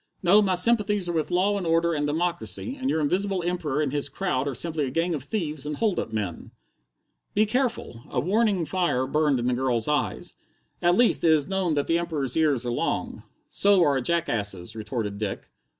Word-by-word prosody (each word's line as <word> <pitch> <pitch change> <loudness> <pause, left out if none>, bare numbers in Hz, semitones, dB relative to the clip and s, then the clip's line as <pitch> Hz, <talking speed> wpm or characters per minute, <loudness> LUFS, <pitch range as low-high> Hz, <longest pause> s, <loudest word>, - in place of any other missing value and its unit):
"No, 195 +4 +6
my 190 -3 +1
sympathies 210 -1 +2
are 175 - -2
with 160 -2 -1
law 200 +3 +1
and 180 - -4
order 165 +1 +2
and 145 -1 -1
democracy, 175 - -2
and 265 -1 -3
your 160 - +1
Invisible 185 +4 0
Emperor 155 -4 -1
and 140 - -2
his 145 -1 0
crowd 145 -4 -2
are 140 - -3
simply 155 +1 -1
a - - -3
gang 165 +6 0
of 150 - -3
thieves 155 -5 -3
and 150 0 -4
hold 215 -5 +1
up - - -4
men." 105 -6 -4 0.9
"Be 215 - +4
careful!" 235 - -2
A - - -1
warning 200 -1 +1
fire 170 -8 0
burned 150 0 +1
in 120 - -2
the 125 - +1
girl's 120 -3 0
eyes. 150 0 -1 0.5
"At 175 0 +3
least, 240 +2 +3
it 165 - +4
is 155 -3 +3
known 190 -4 0
that 145 - 0
the 165 +1 +1
Emperor's 150 -7 -3
ears 145 -6 +2
are 120 - -1
long." 120 - -2 0.3
"So 200 -3 +4
are 145 -3 +3
a 135 - 0
jackass's," 110 - -1
retorted 110 -2 -4
Dick. 105 -3 -5
160 Hz, 205 wpm, -25 LUFS, 135-185 Hz, 0.9 s, No